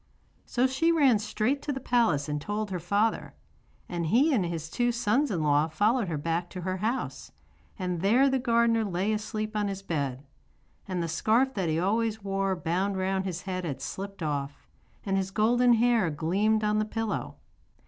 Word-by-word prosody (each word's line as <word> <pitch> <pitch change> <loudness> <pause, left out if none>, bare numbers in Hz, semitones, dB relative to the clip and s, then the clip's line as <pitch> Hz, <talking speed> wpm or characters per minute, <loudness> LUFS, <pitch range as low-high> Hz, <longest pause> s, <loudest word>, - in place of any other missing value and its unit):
So 250 +1 +1
she 265 +6 +2
ran 275 -9 +4
straight 215 +6 -1
to 295 - -3
the 265 - -3
palace 230 - +1
and 150 0 -2
told 210 +3 -3
her 180 - -2
father. 205 +6 0 0.5
And 170 -2 -3
he 270 - +4
and 215 -8 +2
his 165 -2 -4
two 240 +8 0
sons 240 +5 +1
in 175 -7 -1
law 150 +1 +3
followed 210 +7 +1
her 160 -3 -2
back 165 +3 -2
to 185 - -7
her 185 +1 -2
house, 225 +7 -3 0.5
and 180 -4 -3
there 235 +8 +4
the 265 -1 +1
gardener 235 -2 +2
lay 195 +1 -1
asleep 215 0 -3
on 210 -1 0
his 195 -1 -5
bed. 140 -6 -3 0.6
And 180 -3 -2
the - - -2
scarf 225 +11 +2
that 190 -7 -1
he 160 +1 +1
always 220 +3 0
wore 195 -1 0
bound 185 +3 -1
round 190 0 -1
his 180 -2 -4
head 185 -1 -3
had 140 -6 -4
slipped 195 +5 -6
off, 145 -2 -4 0.4
and 195 -1 0
his 190 0 -1
golden 240 +4 +3
hair 230 -5 +3
gleamed 195 +9 +1
on 210 0 +2
the 215 - +1
pillow. 225 0 -3
200 Hz, 190 wpm, -28 LUFS, 175-230 Hz, 0.6 s, ran